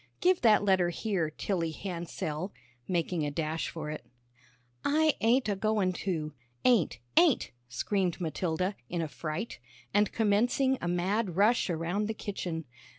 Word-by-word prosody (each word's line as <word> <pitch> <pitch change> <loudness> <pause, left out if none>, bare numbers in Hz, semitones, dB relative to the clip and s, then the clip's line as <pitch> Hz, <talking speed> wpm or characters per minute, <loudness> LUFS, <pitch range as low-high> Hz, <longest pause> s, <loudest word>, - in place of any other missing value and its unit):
Give 365 0 +3
that 215 -3 +5
letter 190 -3 +4
here, 175 -3 -1
Tilly 165 +1 -1
Hansell," 170 0 -4 0.4
making 175 -2 0
a 145 - 0
dash 155 +2 -2
for 155 -2 -5
it. 155 - -6 0.8
"I 310 +1 +3
ain't 240 +3 +3
a 205 - +1
goin' 205 -2 +1
to, 160 -5 -3 0.3
ain't, 230 - +4 0.2
ain't," 335 -7 +4 0.2
screamed 185 +8 0
Matilda, 175 +3 -1
in 170 -1 -1
a - - -2
fright, 155 - -5 0.3
and 205 0 +3
commencing 245 +5 +2
a - - -2
mad 180 +2 0
rush 210 +3 +3
around 175 +5 -1
the 220 - -3
kitchen. 175 -6 -4
185 Hz, 145 wpm, -30 LUFS, 165-215 Hz, 0.8 s, that